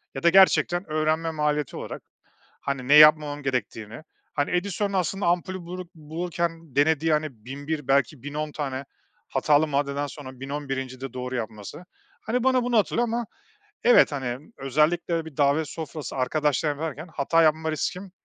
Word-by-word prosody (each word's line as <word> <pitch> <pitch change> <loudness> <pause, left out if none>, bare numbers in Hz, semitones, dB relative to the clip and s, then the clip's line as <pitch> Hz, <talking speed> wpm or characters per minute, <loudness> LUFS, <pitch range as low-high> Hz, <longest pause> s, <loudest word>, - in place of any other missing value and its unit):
ya 135 - -5
da 170 - +6
gerçekten 180 -2 +4
öğrenme 155 +1 +1
maliyeti 150 -2 -1
olarak, - - -6 0.6
hani, 135 -2 -3
ne 145 - +5
yapmamam 150 -1 +6
gerektiğini, 120 -2 -3 0.3
hani, 145 -1 -1
Edison'un 200 +2 -1
aslında 190 +2 -1
ampulü 180 +2 0
bulur 180 +1 -7
bulurken 165 -1 -4
denediği, 160 +2 +3
hani, 155 0 +1 0.2
1001, 145 +2 -5
belki, 135 -1 +1
1010 150 +1 -4
tane 140 -2 -4 0.4
hatalı 150 +1 +3
maddeden 140 0 -1
sonra, 130 -3 -10
1011'incide 135 -2 -5
doğru 125 0 -4
yapması, 110 - -6 0.4
hani, 240 +3 -1
bana 260 -1 +3
bunu 240 -1 +1
hatırlıyor 235 +3 +2
Ama 235 +1 -2 0.6
evet, 245 -8 +6
hani, 135 - -5
özellikle 155 +6 +1
de 165 - -2
bir 160 -4 -11
davet 145 +2 +2
sofrası, 155 -4 -6
arkadaşlarım 145 +2 0
varken 155 0 -4
hata 165 +4 +2
yapma 160 0 +2
riskim 185 +4 -3
150 Hz, 150 wpm, -25 LUFS, 140-170 Hz, 0.6 s, da